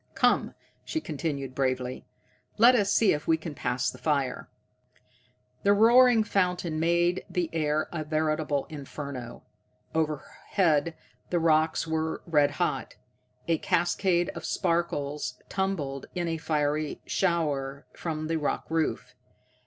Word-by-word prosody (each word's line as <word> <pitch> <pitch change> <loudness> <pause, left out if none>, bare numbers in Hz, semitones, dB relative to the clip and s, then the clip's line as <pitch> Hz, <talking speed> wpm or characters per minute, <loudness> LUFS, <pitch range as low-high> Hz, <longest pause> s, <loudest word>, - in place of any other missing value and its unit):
"Come," - - +2 0.3
she 320 - -2
continued 140 - -4
bravely, 130 -1 -2 0.5
"let 235 +3 +7
us 205 -5 +2
see 220 - +4
if 150 0 -4
we 160 - +4
can 160 -1 -7
pass 125 -2 -1
the - - -13
fire." 140 -4 -1 1.1
The 200 - +4
roaring 235 +2 +6
fountain 180 -5 0
made 170 +2 +2
the 175 -3 -1
air 155 -1 0
a 155 -2 -3
veritable 155 -2 0
inferno. 140 -4 -7 0.5
Overhead 160 +1 0 0.3
the 175 - +1
rocks 160 -1 +2
were 160 0 -2
red 150 -4 +3
hot. - - -1 0.5
A 165 -2 +2
cascade 175 0 +1
of 170 - -7
sparks 150 -4 -1
tumbled 165 -9 -2
in 175 -1 -1
a 165 -1 -1
fiery 150 -1 -1
shower 145 -6 -1
from 155 -2 -4
the 165 +1 0
rock 150 - -1
roof. 160 -1 -1
160 Hz, 125 wpm, -28 LUFS, 145-175 Hz, 1.1 s, let